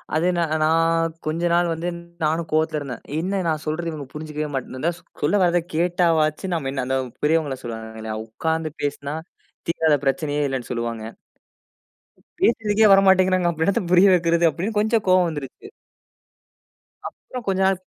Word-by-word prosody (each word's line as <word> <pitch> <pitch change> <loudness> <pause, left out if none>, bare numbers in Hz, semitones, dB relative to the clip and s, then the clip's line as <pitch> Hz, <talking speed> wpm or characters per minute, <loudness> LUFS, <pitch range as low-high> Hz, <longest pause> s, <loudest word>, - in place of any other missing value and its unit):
அது 160 +3 +2
நா - - +2 0.2
நான் 165 +1 +2
கொஞ்ச 160 +2 -2
நாள் 175 0 +3
வந்து 165 +2 -4 0.4
நானும் 160 +2 0
கோவத்தில 155 0 +1
இருந்தேன். 135 -5 -7 0.2
"என்ன 190 +3 -1
நான் 155 -2 0
சொல்றத 165 +2 -2
இவுங்க 150 -3 -6
புரிஞ்சிக்கவே 150 0 -4
மாட்டேன்" 130 -1 -4
இந்த 165 +5 +1 0.3
சொல்ல 150 +8 +2
வராத 175 0 +3 0.2
கேட்டாவாச்சு 170 0 +1
நம்ம 150 -6 -2
என்ன 135 -1 -2
அந்த 130 +1 0 0.3
பெரியவங்கள 150 -3 +1
சொல்லுவாங்க 110 -1 -7
இல்லயா! 110 0 -4
உட்கார்ந்து 160 +6 -2
பேசினா 145 0 -3 0.5
தீராத 160 -2 +2
பிரச்சனையே 145 +1 0
இல்லேன்னு 135 -3 -3
சொல்லுவாங்க 115 -2 -3 1.4
பேசுறதுக்கே 220 -2 +3
வர 195 - +7
மாட்டேங்கிறாங்க, 185 -1 +4
அப்ப 160 -1 -2
என்னத்த 200 +1 +1
புரிய 180 +2 +7
வைக்கிறது? 170 -1 +3
அப்பிடின்னு 200 +7 -2
கொஞ்சம் 220 0 +1
கோவம் 185 -1 +5
வந்துருச்சு. 145 - -8 1.4
அப்புறம் 250 -3 -10
கொஞ்ச 190 -1 +1
நாள். 190 -1 +1
160 Hz, 150 wpm, -22 LUFS, 145-180 Hz, 1.4 s, வர